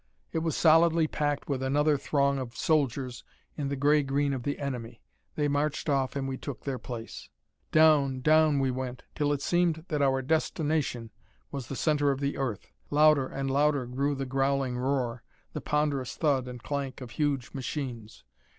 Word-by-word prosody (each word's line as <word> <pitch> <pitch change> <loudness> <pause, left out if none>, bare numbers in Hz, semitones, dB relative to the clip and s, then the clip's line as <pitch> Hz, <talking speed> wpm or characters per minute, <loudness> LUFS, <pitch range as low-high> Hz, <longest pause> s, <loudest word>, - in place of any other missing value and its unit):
It 160 - +1
was 160 -2 -1
solidly 165 0 +5
packed 145 -2 -2
with 135 -3 -1
another 145 +3 +2
throng 140 -1 +1
of 125 -2 -6
soldiers 135 -5 0 0.3
in 145 -2 -3
the 140 - -1
gray 145 +2 +3
green 140 +1 0
of 130 - -3
the 145 +4 -2
enemy. 120 -5 -5 0.3
They 150 -1 +1
marched 145 +2 -1
off 135 -2 +1
and 135 -1 -2
we 135 -1 -3
took 140 -2 -7
their 135 -3 -3
place. 115 -1 -8 0.4
Down, 150 -4 +4
down, 155 +1 +4
we 135 -1 +1
went, 130 0 -5
till 145 -1 0
it 140 -1 -1
seemed 170 -2 +1
that 150 -2 0
our 135 -1 +2
destination 150 -5 -1 0.4
was 135 -4 -5
the 135 - -5
center 145 0 +2
of 135 -1 0
the 140 0 -1
earth. 120 -8 -4 0.2
Louder 150 -2 +4
and 135 0 -3
louder 145 -1 +2
grew 140 +4 -1
the 135 0 -3
growling 135 -1 0
roar, 125 -2 -1 0.3
the - - -4
ponderous 145 -4 -1
thud 140 -5 +1
and 125 -1 -8
clank 140 -3 -3
of 125 -3 -9
huge 140 -4 -1
machines. 125 -5 -5
140 Hz, 180 wpm, -28 LUFS, 130-150 Hz, 0.4 s, solidly